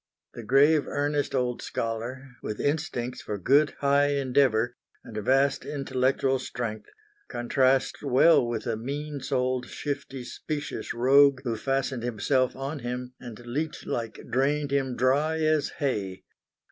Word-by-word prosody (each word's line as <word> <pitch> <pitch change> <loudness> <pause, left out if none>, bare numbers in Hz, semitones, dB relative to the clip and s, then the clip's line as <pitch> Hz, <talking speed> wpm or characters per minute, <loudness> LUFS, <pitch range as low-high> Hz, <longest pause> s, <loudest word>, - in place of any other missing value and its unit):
The - - -7
grave 140 +6 +4
earnest 145 0 -1
old 125 -2 0
scholar, 120 +4 -4
with 105 - -5
instincts 145 -5 -2
for 105 - -4
good, 140 - +3
high 140 0 +4
endeavour, 125 -3 +2 0.3
and 110 - -11
a 105 - -2
vast 135 +5 +2
intellectual 135 -1 0
strength, 115 -4 -5 0.4
contrasts 130 +2 +1
well 140 +4 +5
with 115 -2 -3
the 115 -2 -1
mean 140 +5 -4
souled 130 -1 -1
shifty 135 -3 -5
specious 150 +4 -5
rogue 135 +2 +5
who 120 -3 -1
fastened 135 +1 -1
himself 125 +2 0
on 140 +3 -4
him 125 0 -5
and 120 -1 -10
leech 150 +6 -3
like 115 -2 -4
drained 140 +3 +1
him 135 -3 0
"dry 140 +6 +2
as 155 -1 +2
hay." 100 -10 -2
130 Hz, 135 wpm, -27 LUFS, 120-140 Hz, 0.4 s, well